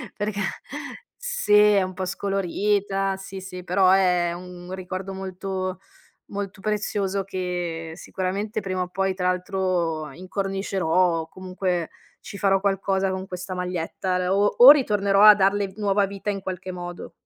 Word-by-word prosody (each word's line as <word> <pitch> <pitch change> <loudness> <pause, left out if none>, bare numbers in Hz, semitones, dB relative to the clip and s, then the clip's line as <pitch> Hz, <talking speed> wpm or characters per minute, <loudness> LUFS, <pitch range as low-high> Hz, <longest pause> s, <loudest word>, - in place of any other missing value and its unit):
perché 205 0 -3 0.8
sì, 485 - -1
è 210 -1 +6
un 185 0 -3
po' 185 0 -3
scolorita 195 +1 0
sì, 195 0 -8
sì, 180 -1 -8
però 185 +1 +3
è 180 -2 +3
un 180 0 -9
ricordo 185 +1 -5
molto 190 0 -4 0.5
molto 200 -1 -6
prezioso 200 -2 -1
che 175 -3 -4
sicuramente 195 +5 -3
prima 185 -1 -2
o 180 - -6
poi 190 +1 -1
tra 180 -1 -1
l'altro 180 -5 -1
incornicerò 195 +2 -3 0.4
o 160 - -8
comunque 185 -1 -3 0.3
ci 200 - -9
farò 195 -1 +3
qualcosa 195 -1 +1
con 190 0 -3
questa 185 0 -6
maglietta 180 +1 -2
le 180 - -1
o 195 +2 +3
o 245 +3 +11
ritornerò 205 -8 +5
a 215 - +11
darle 195 -1 +1
nuova 200 -1 +2
vita 200 +1 -5
in 195 -1 -2
qualche 185 0 -5
modo. 175 -1 -7
190 Hz, 145 wpm, -24 LUFS, 180-200 Hz, 0.8 s, o